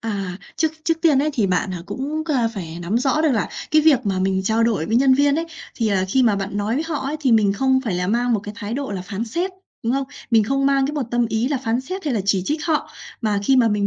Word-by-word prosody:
À, 195 -5 -3 0.2
trước 320 -1 +1
trước 330 -1 0
tiên 310 -5 +5
ấy 305 - +1
thì 225 -8 +1
bạn, 185 +1 0
à, 170 - -6
cũng, 300 +4 -3
a, 235 -3 +2
phải 175 -7 -7
nắm 190 +7 0
rõ 275 +4 +1
được 315 - +3
là 220 - 0 0.2
cái 310 -1 +5
việc 300 -5 +6
mà 195 -2 0
mình 190 0 +1
trao 220 +3 +2
đổi 220 -8 +1
với 225 - +1
nhân 265 0 +5
viên 285 +1 +3
ấy, 330 - -2 0.3
thì, 225 -3 0
à, 190 -2 +1
khi 260 +6 +3
mà 215 -4 +3
bạn 200 +1 -4
nói 205 +3 -1
với 305 +4 -1
họ 315 -3 -2
ấy, 290 +3 -2
thì 260 -5 +2
mình 210 -3 +4
không 260 +4 +2
phải 210 - -1
là 180 0 -1
mang 240 +4 +1
một 215 - +1
cái 205 +1 -8
thái 220 +1 -4
độ 280 -3 -3
là 190 -3 -4
phán 200 +4 -4
xét, 345 - -2 0.3
đúng 230 - +1
không? 275 +1 0 0.3
Mình 225 -2 +5
không 275 +4 +1
mang 275 -1 +3
cái 290 - -3
một 290 - -1
tâm 240 -1 +2
ý 225 +4 0
là 285 -3 0
phán 235 -1 -1
xét 370 +8 -6
hay 285 -5 0
là 210 - 0
chỉ 195 -2 +2
trích 300 +6 -2
họ, 315 -2 0 0.3
mà 210 -3 0
khi 265 +5 +4
mà 240 -3 +5
mình 210 -1 +1
235 Hz, 295 wpm, -21 LUFS, 205-275 Hz, 0.3 s, việc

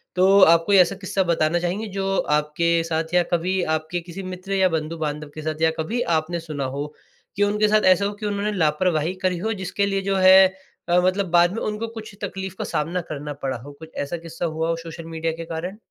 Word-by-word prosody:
तो, 190 +2 +5
आप 165 -2 +6
कोई 200 - +5
ऐसा 185 +1 +5
किस्सा 190 0 0
बताना 170 -1 +1
चाहेंगे 180 +6 -2
जो 195 0 0 0.2
आपके 165 +3 +1
साथ 165 0 -3
या 180 0 +4
कभी 180 +2 +1
आपके 155 +3 -3
किसी 175 +3 -8
मित्र 185 +1 -6
या 190 -1 +3
बंधु-बांधव 155 -1 -4
के 155 - -6
साथ 155 0 -4
या 160 0 +4
कभी 225 +10 -1 0.2
आपने 170 +2 -4
सुना 155 -4 -4
हो? 145 +1 -3 0.5
कि 205 - +2
उनके 210 +1 +2
साथ 215 0 +3
ऐसा 200 +2 -1
हो 205 - -2
कि - - -3
उन्होंने 205 0 -1
लापरवाही 160 +1 +1
करी 185 -1 +1
हो, 220 +6 -2
जिसके 200 +1 -2
लिए 195 -1 -1
जो 195 0 -1
है 190 0 +8 0.4
अ, 175 +1 +5
मतलब 190 +2 +1
बाद 175 0 +5
में 225 - -4
उनको 215 +2 -3
कुछ 220 -2 -9
तक़लीफ़ 190 -1 -5
का - - -3
सामना 170 +4 -2
करना 145 0 -5
पड़ा 135 -2 -1
हो? 135 +5 -11
कुछ 160 0 -11
ऐसा 170 +5 -4
किस्सा 165 +1 -6
हुआ 160 0 -2
हो 165 - +1
सोशल 165 0 -8
मीडिया 165 0 -3
के 165 - -6
कारण? 170 +4 -5
175 Hz, 225 wpm, -23 LUFS, 160-195 Hz, 0.5 s, है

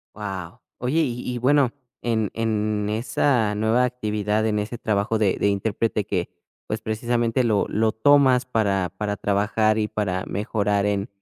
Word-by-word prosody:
Wao. 95 -4 -6 0.2
Oye, 130 +7 0
y 125 -4 -2
y - - -3
bueno, 135 +1 +3 0.3
en 110 -3 0
en 105 -2 -1
esa 110 0 +1
nueva 110 +4 +2
actividad, 105 -3 -1
en 105 -1 0
ese 105 +3 -3
trabajo 110 +1 0
de 100 -4 +2
de - - +1
intérprete 105 +1 -1
que, 90 -4 -2 0.4
pues, 110 +1 -3
precisamente 120 +2 0
lo 110 -4 +2
lo 110 +1 +1
tomas 130 +1 +4
para 100 -7 0
para 105 0 -2
trabajar, 105 +2 +1
y 105 - +1
para 95 -4 -2
mejorar 105 -1 0
en 100 -1 -1
110 Hz, 155 wpm, -23 LUFS, 105-120 Hz, 0.4 s, tomas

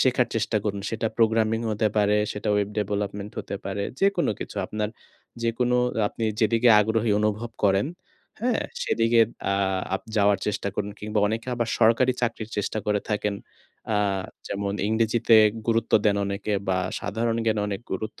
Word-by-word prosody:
শেখার 125 -2 +3
চেষ্টা 115 0 0
করুন। 100 -1 -2
সেটা 115 0 -1
programming 110 0 +2
হতে 110 +1 +1
পারে, 105 0 +3 0.2
সেটা 105 +1 -4
web 100 0 0
development 100 0 -3
হতে 100 - -4
পারে। 100 +1 -3 0.2
যেকোন 195 -3 +2
কিছু, - - -7
আপনার 105 0 -2 0.5
যেকোন 115 +1 0 0.4
আপনি 115 - -4 0.2
যেদিকে 115 +2 +3
আগ্রহী 110 +1 +1
অনুভব 110 +2 -1
করেন, 100 +5 +3 0.5
হ্যাঁ? 245 +1 +1 0.2
সেদিকে 115 - +3 0.3
আ - - +2 0.4
আপ 95 - -3
যাওয়ার 100 -1 +4
চেষ্টা 105 -1 -1
করুন, 105 0 -2
কিংবা 105 0 -2
অনেকে 110 +3 -3 0.3
সরকারি 120 +3 +4
চাকরির 115 -2 -2
চেষ্টা 105 +1 -1
করে 105 -1 +1
থাকেন। 105 -1 0 0.6
আ - - +3 0.5
যেমন 100 0 -2
ইংরেজিতে 115 +1 +3 0.3
গুরুত্ব 115 -1 0
দেন 100 -1 +3
অনেকে 100 +1 -3 0.2
বা 95 0 +2 0.2
সাধারণ 115 +2 -1
জ্ঞানে 110 -2 +1
অনেক 100 0 -3
গুরুত্ব 110 +3 -5
110 Hz, 150 wpm, -25 LUFS, 105-115 Hz, 0.6 s, যাওয়ার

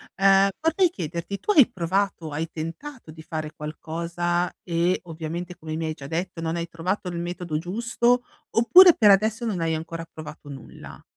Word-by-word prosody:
ehm, 195 0 +5
vorrei 325 +3 +2
chiederti: 170 - -5
tu - - 0
hai 295 - +7
provato, 190 -3 -1
hai 155 +3 -3
tentato 170 - -7
di 160 0 -12
fare 155 -2 -5
qualcosa, 170 +3 -2
e 175 +1 +1
ovviamente 170 +2 -6
come 155 0 -6
mi 165 0 -3
hai 155 - -2
già 140 - -10
detto, 165 +2 -4
non 165 +1 -2
hai 170 0 -3
trovato 180 +4 -3
il 175 - -5
metodo 175 -2 -4
giusto, 235 +7 0 0.3
oppure 340 +11 +8
per 210 -2 +5
adesso 215 +4 +3
non 195 -7 -2
hai 165 0 0
ancora 165 +1 -5
provato 155 -1 -10
nulla? 135 -3 -11
175 Hz, 170 wpm, -24 LUFS, 160-200 Hz, 0.3 s, oppure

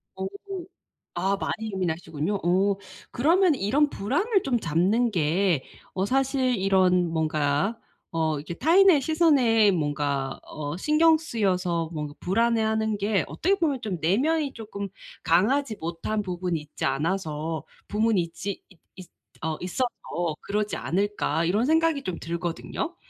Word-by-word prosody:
어. 190 - -4 0.9
아 195 +3 +1
많이 220 -1 -3
예민하시군요. 165 -1 -2
어 190 +3 +3 0.4
그러면 330 +5 +3
이런 280 +8 +2
불안을 360 - 0
좀 245 -4 +1
잡는 195 +9 +2
게 170 -2 +1 0.3
어 190 +1 0
사실 260 0 +1
이런 185 -2 +3
뭔가 155 +5 0 0.3
어 160 -2 0
이게 155 +4 -6
타인의 335 - +5
시선에 260 - +4
뭔가 145 -4 -1
어 145 0 -5
신경 315 +6 +4
쓰여서 185 - -1
뭔가 150 -2 -4
불안해하는 220 +1 +1
게 205 -1 +1
어떻게 390 +4 +1
보면 305 -8 0
좀 200 -5 -3
'내면이 280 - +1
쪼끔 200 -3 -6 0.3
강하지 220 +8 +2
못한 170 +6 -2
부분이 180 -3 -2
있지 150 0 -9
않아서 155 +1 -2 0.2
부문이 215 -1 +2
있지 180 +4 -5
있 185 - -20 0.2
있 185 - -10 0.4
어 160 -1 -1
있어서 240 +8 -1 0.5
그러지 210 +1 -2
않을까?' 185 -4 0
이런 210 +8 +2
생각이 320 -2 +2
좀 185 -7 -3
들거든요. 170 - -4
200 Hz, 275 characters per minute, -26 LUFS, 165-250 Hz, 0.9 s, 타인의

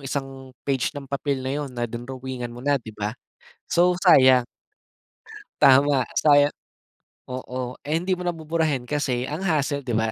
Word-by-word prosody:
isang 135 -1 -6
page 135 +1 -1
ng 140 - -6
papel 140 -1 -3
na 130 - -2
'yon 145 0 -3
na 120 - -1
drinowingan 125 +1 -6
mo 120 +2 -10
na 145 -2 +2
'di 115 - -13
ba, 105 0 -2 0.5
so 175 +1 +2
sayang. 130 -7 +6 1.2
Tama 135 -1 +5
saya 145 -1 +4 0.7
oo 125 0 -6
eh, 150 +2 -2
hindi 180 +3 -3
mo 180 - -4
na 175 - -1
buburahin 160 -4 -1
kasi 125 -2 -1
ang 150 +4 -4
hassle 150 -5 0
'di 125 -4 -3
ba, 110 0 +1
135 Hz, 160 wpm, -24 LUFS, 125-145 Hz, 1.2 s, sayang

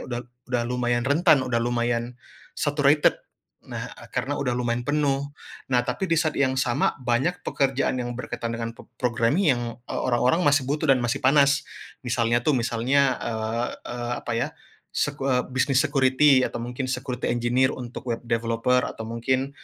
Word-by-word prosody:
uda 120 -1 -4 0.2
udah 125 -1 0
lumayan 120 0 0
rentan, 145 0 +4
udah 115 -2 0
lumayan 120 0 -1 0.4
saturated. 145 0 +3 0.4
Nah, - - -7
ah, - - -12
karena 145 +3 -3
udah 125 -3 0
lumayan 120 0 -1
penuh. 145 -1 0 0.3
Nah, 125 -2 +2
tapi 190 +9 -2
di 165 - +2
saat 155 -1 0
yang 130 -2 +2
sama 130 -2 +1
banyak 130 +10 0
pekerjaan 135 -3 0
yang 120 0 -3
berkaitan 115 -1 -4
dengan 115 0 -3
p - - -13 0.2
programming 125 - +1
yang, 120 -2 0 0.3
eee, - - -3
orang-orang 130 +7 +2
masih 145 -2 +4
butuh 150 +2 -1
dan 135 -3 +4
masih 120 +3 0
panas, 140 +1 +4 0.4
misalnya, 120 -1 +1
tuh, 155 - +3
misalnya, 125 +3 +2
eee, 115 +1 -2 0.2
eee, 120 0 -4
apa, 120 - -4
ya, - - 0 0.5
sek 145 0 -1
eee, 130 -2 +2
bisnis 135 +1 +2
security 135 -1 +4
atau 115 - -5
mungkin 125 +2 -4
security 125 -1 -3
engineer 120 +2 +2
untuk 125 0 -8
web 115 -1 -2
developer 115 +2 +1
atau - - -7
mungkin, 130 +4 -1
125 Hz, 165 wpm, -25 LUFS, 120-140 Hz, 0.5 s, rentan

